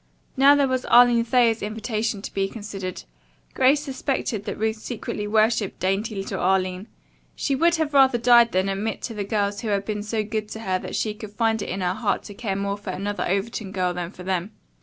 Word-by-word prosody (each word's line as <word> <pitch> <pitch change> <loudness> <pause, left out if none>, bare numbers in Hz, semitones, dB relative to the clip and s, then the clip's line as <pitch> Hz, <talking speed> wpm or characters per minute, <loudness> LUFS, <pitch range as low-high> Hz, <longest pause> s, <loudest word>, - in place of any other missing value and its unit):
Now, 275 +2 +6
there 285 -1 +3
was 260 -1 -1
Arline 240 -1 +6
Thayer's 230 -1 +3
invitation 215 0 -3
to - - -7
be 195 0 0
considered. 195 -4 -6 0.5
Grace 270 +3 +4
suspected 265 -6 -2
that - - -4
Ruth 220 +1 -1
secretly 215 -2 -5
worshipped 215 -1 +1
dainty 200 +4 -1
little 195 0 -4
Arline. 185 +1 0 0.5
She 280 - -1
would 335 +5 +3
have 315 -2 -1
died - - -24 0.2
rather 240 0 +6
than 185 -1 0
admit 200 +2 -3
to 230 - -4
the 210 -2 -3
girls 200 0 -1
who 230 - -5
had 200 -1 0
been 210 -1 -3
so 215 +1 -2
good 215 0 -4
to 220 - -7
her 185 -4 -1
that - - -6
she 215 - -1
could 210 -1 -10
find 225 0 +1
it - - -5
in 190 +2 -3
her 180 0 0
heart 215 +1 -1
to 205 - -9
care 200 -2 -3
more 200 +1 -2
for 205 -1 -8
another 200 +2 -3
Overton 200 +1 -2
girl 180 -2 0
than 175 -1 -4
for 180 -1 -11
them. 190 +2 -2
215 Hz, 215 wpm, -24 LUFS, 195-230 Hz, 0.5 s, Now